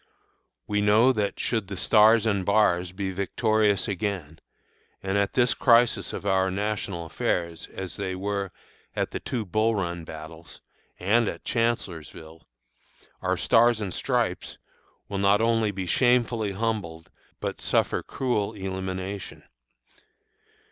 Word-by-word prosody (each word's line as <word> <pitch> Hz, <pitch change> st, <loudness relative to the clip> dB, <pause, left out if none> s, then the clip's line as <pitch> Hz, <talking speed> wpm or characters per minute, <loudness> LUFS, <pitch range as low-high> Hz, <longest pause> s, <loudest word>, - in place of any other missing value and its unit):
We 105 Hz, 0 st, 0 dB
know 110 Hz, +5 st, +5 dB
that 100 Hz, -4 st, -2 dB
should 110 Hz, -5 st, -1 dB
the 100 Hz, 0 st, -6 dB
"Stars 110 Hz, +3 st, +5 dB
and 100 Hz, -4 st, +1 dB
Bars" 90 Hz, -3 st, +2 dB
be 95 Hz, 0 st, -3 dB
victorious 105 Hz, +1 st, +1 dB
again, 95 Hz, -6 st, -3 dB, 0.6 s
and 95 Hz, 0 st, -1 dB
at 100 Hz, -1 st, +1 dB
this 125 Hz, -2 st, +3 dB
crisis 120 Hz, -1 st, +3 dB
of -, -, -6 dB
our 95 Hz, -1 st, +2 dB
national 100 Hz, -3 st, -3 dB
affairs, 85 Hz, 0 st, -2 dB
as 95 Hz, -1 st, -6 dB
they 95 Hz, -2 st, -3 dB
were 100 Hz, 0 st, -3 dB, 0.4 s
at -, -, -1 dB
the -, -, -4 dB
two 120 Hz, -4 st, -3 dB
Bull 110 Hz, +4 st, +1 dB
Run 85 Hz, -3 st, -3 dB
battles, 80 Hz, +1 st, -10 dB, 0.4 s
and 110 Hz, +5 st, +2 dB
at -, -, -5 dB
Chancellorsville, 85 Hz, -9 st, -3 dB, 0.7 s
our -, -, 0 dB
"Stars 120 Hz, 0 st, +4 dB
and 100 Hz, -5 st, -4 dB
Stripes" -, -, -1 dB, 0.5 s
will 100 Hz, -1 st, -3 dB
not 100 Hz, +1 st, +4 dB
only 115 Hz, -1 st, +2 dB
be 95 Hz, -2 st, -4 dB
shamefully 120 Hz, 0 st, +2 dB
humbled, 95 Hz, -7 st, -3 dB, 0.3 s
but -, -, -4 dB
suffer -, -, +1 dB
cruel 115 Hz, -5 st, -2 dB
elimination. 95 Hz, 0 st, -5 dB
100 Hz, 130 wpm, -26 LUFS, 95-110 Hz, 0.7 s, know